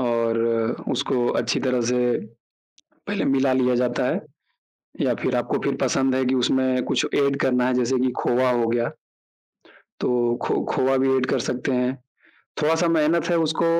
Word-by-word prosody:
और 115 -2 0 0.5
उसको 125 -2 0
अच्छी - - -1
तरह 130 -2 0
से 125 - +1 1.1
पहले - - -1
मिला 135 -1 +2
लिया 125 -1 +2
जाता 120 0 0
है - - -1 0.8
या - - +2
फिर - - 0
आपको - - -1
फिर - - 0
पसंद 130 -1 +1
है, 130 - +1
कि 130 +1 +1
उसमें 130 0 +1
कुछ - - 0
एड 140 -1 +2
करना 125 -1 +2
है 130 - +1
जैसे 125 +1 +1
कि 130 0 +1
खोवा 125 +1 +1
हो 120 -2 +1
गया, 120 0 0 1.1
तो 120 -1 +1
खो - - 0
खोवा 130 +1 +2
भी 135 0 +2
एड 130 -1 0
कर 135 - 0
सकते 125 +2 -2
हैं। 125 0 0 0.7
थोड़ा 155 +2 +3
सा 170 +1 +1
मेहनत 165 0 +2
है 170 - +2
उसको 160 +1 0
130 Hz, 175 wpm, -23 LUFS, 125-135 Hz, 1.1 s, थोड़ा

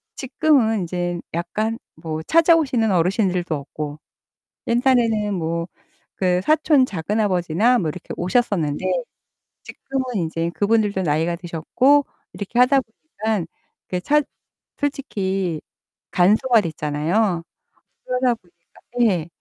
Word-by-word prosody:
지금은 255 -6 +2
인제 175 0 -3
약간 215 +7 -2 0.2
뭐 160 -2 -5
찾아오시는 315 - +3
어르신들도 180 -1 +1
없고 145 +1 -6 0.7
옛날에는 235 -4 +2
뭐 170 -1 -2 0.5
그 180 -1 +2
사촌 310 -3 +4
작은아버지나 200 +2 +1
뭐 170 -8 -1
이렇게 165 +3 -7
오셨었는데 175 -6 0 0.8
지금은 270 -1 -4
인제 165 -3 -1
그분들도 205 -2 +1
나이가 165 +1 0
드셨고 215 - +2 0.3
이렇게 205 +4 -4
하다 250 +2 +5
보니깐 220 - -4 0.4
그 180 -1 -3
찾 300 +7 +2 0.5
솔직히 195 - -2 0.5
간소화됐잖아요. 180 - +2 0.6
그러다 250 -1 +1
보니까 175 -4 -26 0.3
예. 165 -2 -3
195 Hz, 265 characters per minute, -21 LUFS, 170-245 Hz, 0.8 s, 하다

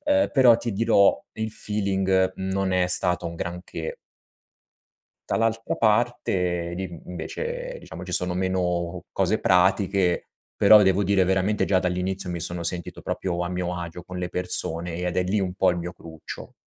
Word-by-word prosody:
uhm, 290 0 +3
però, 125 -5 +6
ti 115 -1 -3
dirò, 100 -1 +4
il 110 0 -4
feeling 95 -3 +1
non 95 0 -1
è 90 -1 +2
stato 90 0 +3
un 85 - -5
granché. 85 -1 -5 1.3
Dall'altra 115 0 0
parte, 95 -6 +1
di 95 - -4 0.2
invece, - - -5
diciamo, - - -9
ci - - -5
sono 90 0 +2
meno 90 -1 -1
cose - - +1
pratiche, 95 0 +2 0.3
però 105 +1 +7
devo 95 +1 +3
dire 95 -1 +3
veramente, 95 +3 +1
già 95 -2 +3
dall'inizio, 90 +1 -2
mi 85 - -3
sono 85 +1 -2
sentito 85 +1 -4
proprio 90 -2 -2
a 90 - -3
mio 90 -1 -3
agio 85 0 -7
con 90 +2 -8
le 90 -1 -3
persone 90 -2 -2
ed 90 0 -3
è 90 - +3
lì 100 +3 0
un 90 -1 -2
po' 95 -1 +3
il 90 - -3
mio 85 +1 -5
cruccio. 80 -3 -10
90 Hz, 160 wpm, -24 LUFS, 90-100 Hz, 1.3 s, però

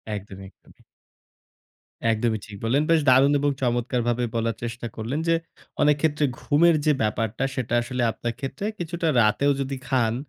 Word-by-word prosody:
একদমই, 95 -1 -9
একদমই। - - -24 1.3
একদমই 110 -1 0
ঠিক 105 - -10
বললেন, 130 +6 +2
বেশ 165 -2 +4
দারুণ 135 +3 +5
এবং 145 0 +2
চমৎকারভাবে 120 -1 0
বলার 115 -1 0
চেষ্টা 120 0 -4
করলেন 115 +7 -3
যে, 165 - +4 0.5
অনেক 150 0 +5
ক্ষেত্রে 150 -2 +2
ঘুমের 165 +3 +4
যে 155 - +5
ব্যাপারটা 110 +3 -1
সেটা 125 -2 -3
আসলে 125 +1 -3
আপনার 120 +1 -4
ক্ষেত্রে 135 +9 -5
কিছুটা 170 0 -2
রাতেও 140 +7 +3
যদি 135 0 -3
খান, 125 -4 +1
125 Hz, 150 wpm, -24 LUFS, 115-145 Hz, 1.3 s, দারুণ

